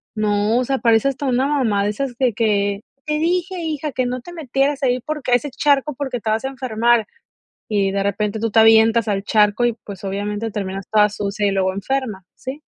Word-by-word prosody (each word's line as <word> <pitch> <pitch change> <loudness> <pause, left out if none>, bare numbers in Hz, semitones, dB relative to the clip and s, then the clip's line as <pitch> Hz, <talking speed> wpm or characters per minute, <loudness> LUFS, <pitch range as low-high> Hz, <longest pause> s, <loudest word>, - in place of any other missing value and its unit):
no, 210 +1 +1
o 255 - 0
sea, 270 0 -1
parece 230 +2 +3
hasta 275 +1 -4
una 255 +2 +2
mamá 230 -9 +1
de 210 - +1
esas 245 +2 -4
de 250 -4 +1
que: 205 -2 0 0.2
"Te 300 0 -1
dije, 360 +3 0
hija, 305 -2 -3
que 255 - 0
no 250 +1 -2
te 350 - -11
metieras 280 -2 -1
ahí, 250 -1 +2
porque 300 -1 -4
a - - +8
ese 285 +4 -1
charco, 285 0 +1
porque 265 -4 -3
te 220 - -3
vas 220 +3 0
a - - -1
enfermar". 240 -3 +1 0.6
Y 200 -2 +1
de 200 0 -1
repente 205 +2 -1
tú 225 0 -1
te 225 - +4
avientas 225 0 +5
al 195 -1 -1
charco 210 +3 +3
y 240 - +2
pues 200 -2 -9
obviamente 205 +3 -3
terminas 195 -1 -5
toda 210 -1 +4
sucia 205 0 -3
y - - +1
luego 190 -1 0
enferma. 215 -2 -3
Sí. 270 +3 -7
225 Hz, 215 wpm, -20 LUFS, 205-270 Hz, 0.6 s, a